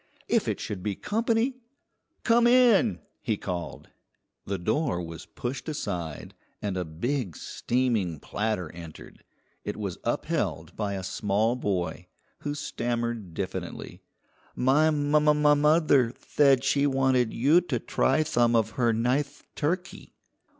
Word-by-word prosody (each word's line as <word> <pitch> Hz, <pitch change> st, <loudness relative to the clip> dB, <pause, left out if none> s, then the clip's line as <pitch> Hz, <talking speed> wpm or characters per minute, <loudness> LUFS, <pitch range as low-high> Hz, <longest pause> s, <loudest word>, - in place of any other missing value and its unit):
If -, -, +1 dB
it -, -, -1 dB
should 100 Hz, -3 st, -5 dB
be 100 Hz, 0 st, -2 dB
company! 230 Hz, -, 0 dB, 0.7 s
"Come 235 Hz, 0 st, +4 dB
in!" 240 Hz, -3 st, +5 dB, 0.2 s
he 110 Hz, -5 st, -1 dB
called. 90 Hz, -3 st, -5 dB, 0.6 s
The 100 Hz, -, -1 dB
door 120 Hz, -, 0 dB
was 85 Hz, -1 st, -7 dB
pushed 125 Hz, +5 st, -5 dB
aside 90 Hz, -, -4 dB, 0.3 s
and 100 Hz, -2 st, -3 dB
a 90 Hz, -, -1 dB
big, 95 Hz, -, -3 dB
steaming 115 Hz, -, -1 dB
platter 105 Hz, -4 st, -2 dB
entered. 85 Hz, -2 st, -11 dB, 0.4 s
It -, -, -4 dB
was 100 Hz, -5 st, -4 dB
upheld -, -, -2 dB
by 105 Hz, -2 st, -2 dB
a 95 Hz, -, -4 dB
small 105 Hz, +5 st, 0 dB
boy, 90 Hz, -6 st, -2 dB, 0.3 s
who 145 Hz, 0 st, -3 dB
stammered 120 Hz, -, -3 dB
diffidently, -, -, -5 dB, 0.5 s
"My 140 Hz, +5 st, +4 dB
moth 150 Hz, 0 st, +3 dB
moth 150 Hz, 0 st, +4 dB
mother 150 Hz, -5 st, +4 dB
thaid 135 Hz, +1 st, +2 dB
she 140 Hz, +1 st, +2 dB
wanted 130 Hz, -3 st, +2 dB
you 145 Hz, +9 st, +4 dB
to 125 Hz, -, 0 dB
try 135 Hz, +5 st, +1 dB
thum 120 Hz, -5 st, +2 dB
of 110 Hz, -1 st, +2 dB
her 120 Hz, -1 st, +2 dB
nith 135 Hz, +6 st, 0 dB
turkey." 175 Hz, +5 st, -3 dB
120 Hz, 130 wpm, -27 LUFS, 100-150 Hz, 0.7 s, in